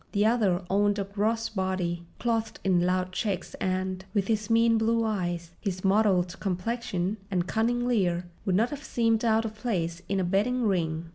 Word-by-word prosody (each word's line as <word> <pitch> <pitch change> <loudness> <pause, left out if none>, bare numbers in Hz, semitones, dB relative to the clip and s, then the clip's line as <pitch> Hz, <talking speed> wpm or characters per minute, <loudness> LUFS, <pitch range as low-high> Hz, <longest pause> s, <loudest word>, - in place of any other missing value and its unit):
The 205 0 +3
other 210 -6 +2
owned 205 +2 +2
a 200 - 0
gross 215 +3 -1
body 185 -4 -2 0.2
clothed 225 -2 -1
in 180 -2 +3
loud 185 0 0
checks 195 -1 -2
and, 185 0 -1
with 200 0 +1
his 215 -1 0
mean 230 0 +4
blue 230 +1 +2
eyes, 175 -6 -2
his 185 -3 -3
mottled 190 -3 +2
complexion, 195 0 -2
and 180 -3 0
cunning 235 +4 0
leer, 180 -8 +1 0.2
would 190 -3 +1
not 225 +5 +2
have 290 0 -6
seemed 230 -5 +1
out 225 -1 +3
of 220 - -4
place 180 -7 -2
in 195 0 +1
a - - +1
betting 210 +8 +1
ring. 170 -6 0
200 Hz, 180 wpm, -27 LUFS, 185-225 Hz, 0.2 s, mean